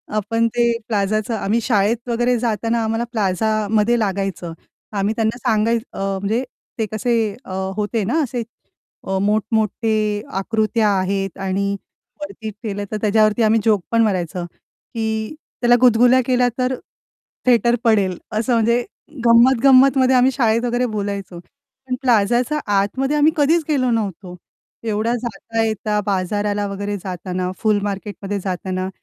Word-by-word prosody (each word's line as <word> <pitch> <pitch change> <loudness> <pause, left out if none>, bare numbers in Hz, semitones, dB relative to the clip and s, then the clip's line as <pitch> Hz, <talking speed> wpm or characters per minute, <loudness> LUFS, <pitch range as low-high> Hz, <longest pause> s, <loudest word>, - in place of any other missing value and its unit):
आपण 230 +2 +1
ते 235 0 +3 0.2
प्लाझाचं 215 +1 0
आम्ही 215 +2 0
शाळेत 225 +2 0
वगैरे 240 +1 +1
जाताना 230 0 0
आम्हाला 225 +1 -1
प्लाझामध्ये 215 +2 +1
लागायचं. 195 -4 -2 0.4
आम्ही 200 +1 0
त्यांना 225 +1 0
सांगाय 225 +1 +1 0.2
अ, - - -7 0.2
म्हणजे 220 +5 0 0.4
ते 220 - +1
कसे 235 +3 -1 0.3
अ, 185 - -7 0.2
होते 210 +1 -1
ना 295 +11 0
असे 245 -2 -3 0.7
अ, 190 0 0
मोठमोठे 220 +1 0 0.5
आकृत्या 220 +1 +1
आहेत 195 -1 -2
आणि 200 +1 0 0.5
वरती 200 +2 -6
केलं, 205 -1 -5
तर 215 - -1
त्याज्यावरती 215 +1 +3
आम्ही 220 +1 +4
जोक 210 -4 +3
पण 230 - +3
मारायचं, 180 -4 -1
की 220 - -6 0.3
त्याला 240 0 +5
गुदगुल्या 245 +1 +5
केल्या, 250 -1 +2
तर 255 0 0 0.7
थिएटर 240 -1 +4
पडेल, 200 -6 +2
असं 225 +4 0
म्हणजे 235 +1 +2 0.4
गंमत-गंमतमध्ये 260 +2 +5
आम्ही 255 +1 +4
शाळेत 230 -2 +1
वगैरे 245 +1 0
बोलायचो. 200 -4 -4
पण 265 +4 -9
प्लाझाच्या 245 +4 +2
आतमध्ये 260 +9 +1
आम्ही 300 +2 +4
कधीच 315 +3 +3
गेलो 260 -4 +2
नव्हतो. 195 -5 -3 0.5
एवढा 220 +1 0
जाता-येता 220 -1 -2
बाजाराला 205 +1 -1
वगैरे 200 +1 -4
जाताना, 180 0 -4
फुल 215 -2 +2
मार्केटमध्ये 200 0 -4
जाताना 185 0 -3
220 Hz, 130 wpm, -20 LUFS, 200-240 Hz, 0.7 s, त्याला